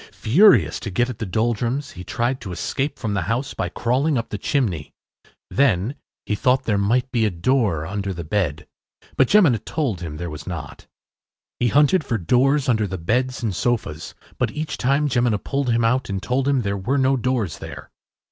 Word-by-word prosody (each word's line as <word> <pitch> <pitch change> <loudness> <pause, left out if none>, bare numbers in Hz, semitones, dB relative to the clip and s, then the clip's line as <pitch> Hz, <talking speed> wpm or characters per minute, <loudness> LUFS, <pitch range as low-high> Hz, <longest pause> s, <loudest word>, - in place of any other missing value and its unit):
Furious 120 - +4
to - - -5
get 120 +6 0
at 110 - -10
the 110 - -3
Doldrums, 120 +7 -1
he 90 - -9
tried 120 +5 -2
to 100 -6 -6
escape 135 - -2
from 110 -4 -3
the 100 - 0
house 125 +4 -1
by - - -2
crawling 130 +5 0
up 115 - -3
the 105 - -4
chimney. 100 - -1 0.6
Then 120 -4 +2 0.3
he - - -1
thought 130 +5 +2
there 105 -5 +1
might 125 +6 +1
be 115 -2 +1
a 110 - +3
door 95 - 0
under 100 +3 -3
the 85 -2 -5
bed, 80 -3 -1 0.5
but 130 - +4
Jemina 165 - +5
told 130 - -2
him 80 -3 -6
there 85 +2 -4
was 75 0 -9
not. 80 -6 -7 0.7
He 120 - +2
hunted 150 - +4
for 120 -4 -1
doors 130 - +2
under 110 -4 +2
the 95 0 -4
beds 125 +9 -1
and 105 -5 -1
sofas, 95 -9 -2 0.2
but - - +1
each 155 +1 -4
time 140 +4 +2
Jemina 120 -4 +2
pulled 135 +5 -2
him 115 -1 +2
out 125 +2 +1
and 100 -1 -2
told 125 +6 -1
him 135 -3 +2
there 100 -1 -1
were 125 +9 -1
no 135 0 +3
doors 120 -9 -1
there. - - -9
120 Hz, 195 wpm, -22 LUFS, 100-130 Hz, 0.7 s, Jemina